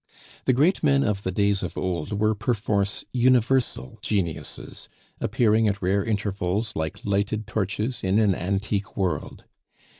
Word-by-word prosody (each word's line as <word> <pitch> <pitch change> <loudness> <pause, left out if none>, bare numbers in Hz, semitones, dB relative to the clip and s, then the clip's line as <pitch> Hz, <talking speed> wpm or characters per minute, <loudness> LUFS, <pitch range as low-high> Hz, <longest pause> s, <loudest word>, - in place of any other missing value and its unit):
The 130 - +4
great 155 +10 +3
men 140 -2 +3
of 100 -2 0
the 95 - -2
days 100 +1 +1
of 90 - -5
old 90 +2 -2
were 110 +1 +3
perforce 105 -2 -1
universal 125 - +2
geniuses, 90 -8 -3 0.3
appearing 110 0 +2
at 100 -1 0
rare 95 +1 +1
intervals 105 0 -1
like 80 0 -3
lighted 105 +2 0
torches 110 +3 -2
in 95 +2 +2
an 105 -3 +4
antique 100 +3 -2
world. 95 -3 -2
105 Hz, 140 wpm, -25 LUFS, 95-110 Hz, 0.3 s, The